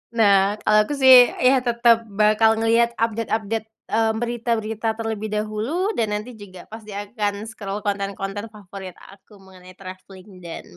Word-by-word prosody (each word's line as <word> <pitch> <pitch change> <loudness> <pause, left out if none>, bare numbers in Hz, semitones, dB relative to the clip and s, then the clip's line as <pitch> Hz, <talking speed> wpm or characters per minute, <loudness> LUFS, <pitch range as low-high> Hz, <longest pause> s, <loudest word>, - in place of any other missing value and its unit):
Nah, 200 -2 +3
kalau 215 - +3
aku 295 - -3
sih, 260 -1 +7 0.3
ya 260 +1 +5
tetap 235 -2 +2
bakal 215 +2 +3
ngelihat 230 +1 +1
update-update, 225 -1 -2 0.2
mmm, 220 0 +1
berita-berita 225 -2 -2
terlebih 220 -1 -4
dahulu, 220 - -2
dan 220 - +1
nanti 215 +4 -6
juga 185 -3 -12
pasti 215 -2 -10
akan 205 0 -4
scroll 205 -2 -7
konten-konten 200 +1 -4
favorit 195 -3 -11
aku 200 +1 -18
mengenai 185 -1 -16
travelling, 185 0 -13
dan 170 -2 -9
215 Hz, 140 wpm, -22 LUFS, 200-225 Hz, 0.3 s, sih